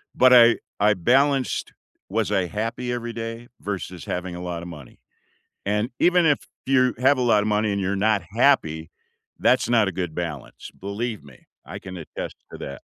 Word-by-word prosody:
but 130 0 +6
I 120 -1 +7 0.2
I 105 +1 +4
balanced, 135 +8 +1 0.4
"Was 110 +2 -1
I 95 - +2
happy 115 +5 -3
every 120 -1 -4
day?" 115 +1 -6
versus 95 -3 -5
having 90 0 -4
a 90 - -7
lot 90 -1 -4
of - - -7
money, 75 -7 -12 0.7
and 105 +4 0
even 175 -1 +4
if 150 -3 +3 0.3
you 130 -2 +3
have 130 +2 +4
a - - +1
lot 115 -4 +4
of - - -2
money 105 0 +1
and 100 - -1
you're 95 +1 -1
not 105 0 +2
happy, 80 - +2 0.5
that's - - +3
not 115 -4 +4
a - - -1
good 90 -3 -4
balance. 80 -6 -6
Believe 105 +2 -4
me. 70 -3 -17 0.2
I 90 +6 -7
can 95 -2 -9
attest 85 - -7 0.2
to - - -8
that. - - -7
105 Hz, 185 wpm, -23 LUFS, 90-120 Hz, 0.7 s, I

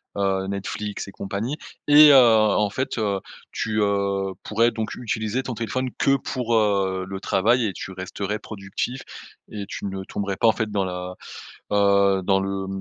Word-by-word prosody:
heu, 95 -1 0
Netflix 100 +1 -4
et - - -9
compagnie. 105 +10 -4 0.3
Et, 150 0 +9
heu, - - +8
en 110 -4 +5
fait, 130 +1 -3
heu, 100 -3 0 0.3
tu, 110 0 -2
heu, 100 -1 0
pourrais 115 +2 +2
donc 110 -2 -4
utiliser 110 0 -2
ton 130 -3 -5
téléphone 130 +3 -2
que 135 0 +3
pour, 125 -2 -3
heu, 100 -3 +1
le 95 0 -5
travail 115 +6 +2
et 100 - -2
tu - - -7
resterais 95 +3 -4
productif 110 +6 -5 0.5
et 105 -2 -5
tu - - -6
ne 95 -1 -4
tomberais 100 0 -4
pas 115 - 0
en - - +7
fait 110 -1 -3
dans 100 -2 0
la 90 0 -5 0.6
heu, 100 -1 +3
dans 95 +1 +3
le 95 0 -3
100 Hz, 175 wpm, -23 LUFS, 95-115 Hz, 0.6 s, Et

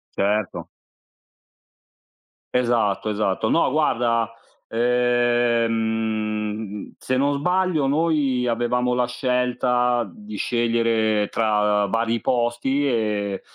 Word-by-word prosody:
Certo. 105 0 -1 1.9
Esatto, 120 -4 +1
esatto. 105 +1 -1
No 165 - +3
guarda, 115 -6 +1 0.3
ehm, 115 -3 0
se 130 - -2
non 140 +2 +1
sbaglio 180 -1 +1
noi 140 -4 +1
avevamo 125 +1 0
la 125 0 +2
scelta 125 -1 0
di 105 +4 -10
scegliere 115 -2 +1
tra 105 -2 +1
vari 115 +3 0
posti 125 +4 0
e 105 -5 -1
120 Hz, 85 wpm, -22 LUFS, 110-125 Hz, 1.9 s, No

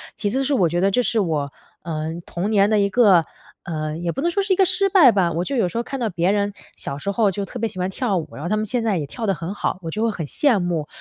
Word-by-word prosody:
其 205 - -1
次 270 +2 0
是 280 +1 +1
我 180 -7 +3
觉 175 +2 -1
得 195 - +3
这 250 +5 +2
是 230 - +1
我， 150 -7 -1 0.3
嗯， 160 0 -4
童 185 +5 -3
年 205 -2 +4
的 210 - +4
一 200 0 +2
个， 195 -7 +5 0.4
嗯 155 0 -4
也 170 - 0
不 270 - -4
能 345 +2 +1
说 400 - +1
是 390 -1 +1
一 - - +2
个 385 - +4
失 380 +2 +1
败 340 - +7
吧， 185 -4 +1
我 170 +2 -1
就 280 - -3
有 190 -7 +2
时 230 - -5
候 235 - 0
看 270 +1 -5
到 230 -3 0
别 180 +1 +1
人 205 -1 0 0.2
小 140 - -5
时 200 +8 -3
候 210 -1 +2
就 200 +1 -3
特 245 - -8
别 225 - 0
喜 185 - -12
欢 180 - 0
跳 200 -2 -1
舞， 160 - -3
然 - - -8
后 175 - -3
他 215 - +1
们 215 - -1
现 235 +2 -1
在 215 -4 +1
也 150 - -2
跳 225 +10 -6
得 195 - +3
很 170 +4 -5
好， 195 - -2
我 165 - -4
就 215 - -3
会 230 - +2
很 170 -5 -5
羡 250 - +2
慕。 170 -4 -2
200 Hz, 340 characters per minute, -22 LUFS, 170-235 Hz, 0.4 s, 败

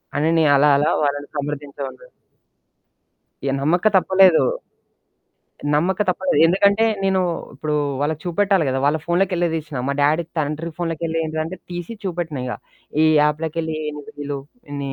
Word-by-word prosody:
అని 155 +3 +2
నే 160 - +4
అలా 145 +2 +5
అలా 150 +2 +2
వాళ్ళని 145 0 -1
సమర్దించావాడిని. 145 - -5 1.4
ఏహ్! 135 - +1
నమ్మక 175 +8 +2
తప్పలేదు. 190 -2 +5 1.3
నమ్మక 180 +6 +1
తప్పలేదు. 180 -4 +1
ఎందుకంటే 200 +5 +3 0.2
నేను 190 -1 +2 0.4
ఇప్పుడు 150 -1 -2 0.3
వాళ్ళకి 155 +1 -1
చూపెట్టాలి 190 -1 +2
కదా! 130 +1 0
వాళ్ళ 150 +2 +3
ఫోన్లోకిెళ్ళే 175 -1 +1
తీసినా. 150 -4 -5
మా 140 - 0
డ్యాడీ 155 +4 +3
తండ్రి 155 +2 -2
ఫోన్లోకిెళ్ళి 165 -1 -2
ఏంటిందంటే 160 +3 -3
తీసి 175 +5 -5
చూపెట్టినా 170 -7 -3
ఇగ. 125 - -3 0.5
ఈ - - +5 0.2
యాప్లోకెళ్ళి 160 +1 -1 0.5
ఈళ్లు 140 -1 -4 0.4
ని 135 -1 -3
160 Hz, 130 wpm, -21 LUFS, 145-175 Hz, 1.4 s, అలా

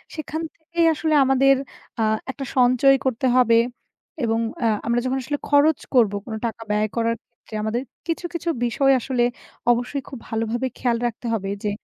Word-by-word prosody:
সেখান 315 0 -4
থেকেই 335 +1 -1
আসলে 315 0 -1
আমাদের 270 +1 +4 0.4
আ 225 - +2 0.3
একটা 275 0 -6
সঞ্চয় 255 +2 +5
করতে 260 0 +1
হবে। 230 -2 +5 0.7
এবং 225 0 +1 0.3
আ - - +4 0.2
আমরা 235 0 +2
যখন 260 +1 0
আসলে 290 +3 -3
খরচ 290 +1 +4
করবো 225 -6 +4
কোনো 220 -2 -5
টাকা 230 0 -4
ব্যয় 210 +1 +2
করার 230 0 +1
ক্ষেত্রে 235 - -21
আমাদের 225 +3 -1 0.3
কিছু, 335 +1 -2
কিছু 340 0 -2 0.2
বিষয় 270 +3 +3
আসলে 250 0 0 0.5
অবশ্যই 245 +4 -1
খুব 265 - -7
ভালোভাবে 230 +3 -1
খেয়াল 240 -2 +1
রাখতে 235 +1 -7
হবে 195 -3 -2
যে 210 - 0
250 Hz, 165 wpm, -23 LUFS, 230-275 Hz, 0.7 s, সঞ্চয়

